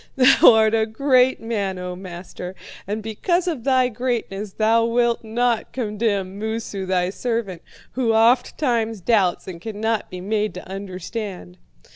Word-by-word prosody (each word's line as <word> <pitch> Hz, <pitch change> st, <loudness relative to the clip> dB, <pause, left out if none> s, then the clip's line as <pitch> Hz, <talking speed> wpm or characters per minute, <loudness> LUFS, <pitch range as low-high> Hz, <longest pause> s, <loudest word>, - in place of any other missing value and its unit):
'Thou 270 Hz, 0 st, +7 dB
art 220 Hz, -1 st, +4 dB
a 220 Hz, -1 st, +2 dB
great 255 Hz, +2 st, +3 dB
man, 205 Hz, -5 st, -2 dB
O 180 Hz, 0 st, -5 dB
master, 180 Hz, 0 st, -8 dB, 0.3 s
and 210 Hz, +2 st, -3 dB
because 345 Hz, -, -1 dB
of 305 Hz, -10 st, -2 dB
thy 260 Hz, -1 st, +3 dB
greatness 220 Hz, -5 st, -3 dB
thou 225 Hz, +1 st, +3 dB
wilt 235 Hz, 0 st, +1 dB
not 235 Hz, +1 st, 0 dB
condemn 210 Hz, -5 st, -2 dB
Moosu, 220 Hz, -3 st, -4 dB
thy 185 Hz, -1 st, +1 dB
servant, 225 Hz, -6 st, -3 dB, 0.3 s
who 245 Hz, -3 st, 0 dB
ofttimes 230 Hz, 0 st, +2 dB
doubts 190 Hz, -2 st, +1 dB
and 170 Hz, -3 st, -8 dB
cannot 220 Hz, +1 st, -2 dB
be 180 Hz, -, -7 dB
made 210 Hz, +2 st, -1 dB
to 180 Hz, -, -8 dB
understand.' 190 Hz, -1 st, -6 dB
220 Hz, 140 wpm, -22 LUFS, 195-235 Hz, 0.3 s, Thou